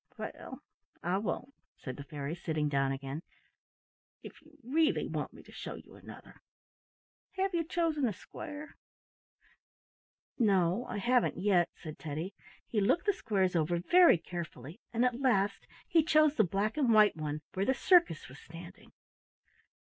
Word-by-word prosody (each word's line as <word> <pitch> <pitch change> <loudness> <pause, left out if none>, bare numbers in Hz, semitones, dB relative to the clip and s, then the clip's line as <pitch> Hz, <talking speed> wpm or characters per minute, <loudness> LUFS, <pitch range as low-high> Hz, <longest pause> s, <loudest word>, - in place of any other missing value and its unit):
"Well, - - -8 0.4
I 180 +3 +1
won't," 210 +7 -4 0.2
said 130 - -7
the 140 - -8
fairy, 145 0 -5
sitting 155 -3 -2
down 135 -1 +1
again, 135 +3 -5 1.0
"if - - -11
you 310 0 -21
really 310 +6 +2
want - - -3
me - - -14
to - - -16
show - - -7
you - - -14
another. - - -13 0.9
Have 385 0 0
you 335 -1 +1
chosen 320 -4 0
a - - 0
square?" 295 - -9 1.6
"No, 195 0 +2
I - - -4
haven't 245 +4 +2
yet," 180 -3 +3
said 155 -1 -9
Teddy. 160 +5 -5 0.3
He 215 - -1
looked 260 - +2
the 410 - +3
squares 195 - 0
over 170 +1 +1
very 345 - +6
carefully, 165 -3 -7
and 235 +2 +2
at 250 +1 0
last 200 -6 +1 0.2
he 330 - +4
chose 310 -1 +4
the 225 - +3
black 200 - -1
and 265 -6 +3
white 215 -2 +6
one 150 -1 -4
where 190 +1 0
the 265 - +3
circus 345 - +3
was 135 +3 -13
standing. 170 +2 -12
200 Hz, 155 wpm, -32 LUFS, 165-275 Hz, 1.6 s, very